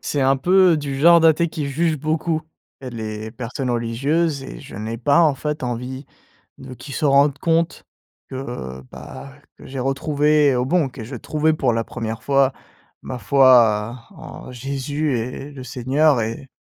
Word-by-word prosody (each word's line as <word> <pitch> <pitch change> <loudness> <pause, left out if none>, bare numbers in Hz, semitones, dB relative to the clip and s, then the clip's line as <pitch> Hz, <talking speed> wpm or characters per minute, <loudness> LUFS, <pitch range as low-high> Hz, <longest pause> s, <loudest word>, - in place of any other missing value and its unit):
c'est 145 - -2
un 135 +1 +3
peu 180 +4 +4
du 140 -2 -4
genre 170 +3 +7
d'athée 165 +1 +4
qui 155 -3 -4
juge 155 +2 0
beaucoup, 155 +2 -1 0.4
les 110 -4 -6
personnes 125 +2 -4
religieuses, 135 +6 0
et - - -9
je 135 - -11
n'ai 110 +2 -4
pas, 140 +7 +3
en 155 -4 +4
fait, 150 +2 -4
envie, 125 +2 -5 0.5
de - - -10
qu'ils 135 +3 -9
se 160 - -2
rendent 140 0 +4
compte, 165 0 0 0.5
que, 130 - -6
heu, 65 - -6
bah 135 - -10 0.3
que - - -13
j'ai 135 0 -6
retrouvé 145 +2 +2
au 125 - 0
bon 165 -1 +2
que 125 -3 -9
j'ai 125 +2 -7
trouvé 155 +6 0
pour 130 -5 +1
la 115 0 -1
1re 110 0 -5
fois 135 -1 +2 0.5
ma 130 - -6
foi, 120 -1 +4
en 160 -7 -11
Jésus 140 +3 -2
et 125 +5 -6
le 135 -2 -9
Seigneur, 130 +2 +2
et 115 +5 -5
135 Hz, 170 wpm, -21 LUFS, 125-150 Hz, 0.5 s, genre